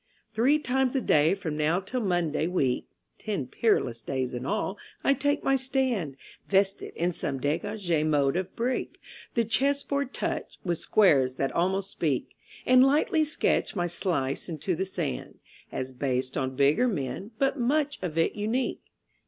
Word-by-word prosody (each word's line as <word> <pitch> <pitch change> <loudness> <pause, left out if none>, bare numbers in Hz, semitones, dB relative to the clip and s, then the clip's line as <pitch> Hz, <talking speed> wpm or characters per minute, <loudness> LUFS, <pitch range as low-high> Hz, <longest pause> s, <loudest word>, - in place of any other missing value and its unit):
Three 250 +7 +4
times 265 -2 0
a - - +3
day 155 -2 +4
from 165 -6 -4
now 155 +4 +2
till 245 +6 -3
Monday 175 -6 0
week 140 -9 0 0.3
(Ten 200 -11 -3
peerless 125 - +1
days 130 +1 -2
in 125 +2 -4
all) 195 - -2 0.2
I 275 - +4
take 285 +1 0
my 270 - +3
stand 255 - 0 0.3
Vested 195 0 +1
in 175 +2 0
some 140 -5 -2
dégagé 165 +3 -1
mode 145 -3 +2
of 185 +1 -3
breek 245 +2 -2 0.4
(The 230 -1 +2
chess 275 +6 +1
board 280 -2 -2
touch, - - -3
with 175 -3 -1
squares 135 -11 +4
that 135 0 -1
almost 190 +3 0
speak), 145 -7 -1 0.3
And 255 0 +7
lightly 300 +3 +3
sketch 305 -6 0
my 175 -2 0
Slice 165 -5 -1
into 165 +3 -2
the 190 +3 -2
Sand, 65 - -4 0.3
As 130 0 -4
based 130 0 -2
on 130 -1 -2
bigger 145 - +3
men, 155 - -3
but 270 +1 +1
much 290 +4 +1
of 170 -4 -4
it 165 - +2
unique.... 225 +5 -1
185 Hz, 160 wpm, -27 LUFS, -, 0.4 s, And